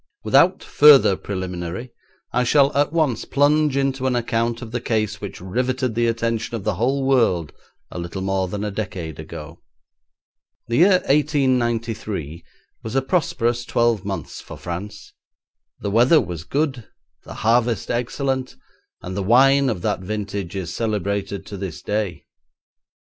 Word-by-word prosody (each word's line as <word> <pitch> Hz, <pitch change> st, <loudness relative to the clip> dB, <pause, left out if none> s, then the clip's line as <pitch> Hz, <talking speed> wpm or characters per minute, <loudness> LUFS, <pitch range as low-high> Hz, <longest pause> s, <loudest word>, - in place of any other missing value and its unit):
Without -, -, +4 dB
further 145 Hz, -9 st, +6 dB
preliminary 95 Hz, +4 st, -5 dB, 0.4 s
I 125 Hz, +1 st, +2 dB
shall 140 Hz, +3 st, +3 dB
at 145 Hz, +1 st, +2 dB
once 155 Hz, -7 st, +1 dB
plunge 145 Hz, 0 st, +2 dB
into 135 Hz, -1 st, 0 dB
an 130 Hz, -, +1 dB
account 115 Hz, 0 st, -1 dB
of 110 Hz, -, -9 dB
the 120 Hz, 0 st, -3 dB
case 110 Hz, -3 st, -1 dB
which 100 Hz, -, -7 dB
riveted 125 Hz, +6 st, -1 dB
the 120 Hz, +1 st, +1 dB
attention 115 Hz, 0 st, -1 dB
of 110 Hz, -, -5 dB
the 105 Hz, -, 0 dB
whole 130 Hz, +8 st, 0 dB
world 115 Hz, -, +2 dB, 0.4 s
a -, -, -6 dB
little 85 Hz, +2 st, -5 dB
more 95 Hz, -1 st, 0 dB
than 100 Hz, +3 st, -4 dB
a 105 Hz, -, -2 dB
decade 90 Hz, -7 st, -5 dB
ago. -, -, -9 dB, 1.1 s
The 115 Hz, -, 0 dB
year 185 Hz, +2 st, +5 dB
1893 120 Hz, -, 0 dB, 0.4 s
was 110 Hz, +2 st, -6 dB
a 135 Hz, -, +2 dB
prosperous 120 Hz, -7 st, 0 dB
twelve 120 Hz, -4 st, +1 dB
months 100 Hz, -1 st, -5 dB
for -, -, -10 dB
France. 100 Hz, +4 st, -7 dB, 0.7 s
The 100 Hz, -, -2 dB
weather 125 Hz, +9 st, +5 dB
was 85 Hz, -, -5 dB
good, 135 Hz, -5 st, -2 dB, 0.4 s
the -, -, -10 dB
harvest 115 Hz, 0 st, +1 dB
excellent, 130 Hz, +2 st, -2 dB, 0.5 s
and 90 Hz, +1 st, -5 dB
the 100 Hz, -, -1 dB
wine 135 Hz, +6 st, +5 dB
of 100 Hz, -8 st, -3 dB
that -, -, 0 dB
vintage 100 Hz, -1 st, -4 dB
is 95 Hz, -3 st, -4 dB
celebrated 100 Hz, -3 st, -2 dB
to 100 Hz, -, -7 dB
this 95 Hz, -4 st, -6 dB
day. 105 Hz, -6 st, -2 dB
115 Hz, 150 wpm, -22 LUFS, 100-130 Hz, 1.1 s, further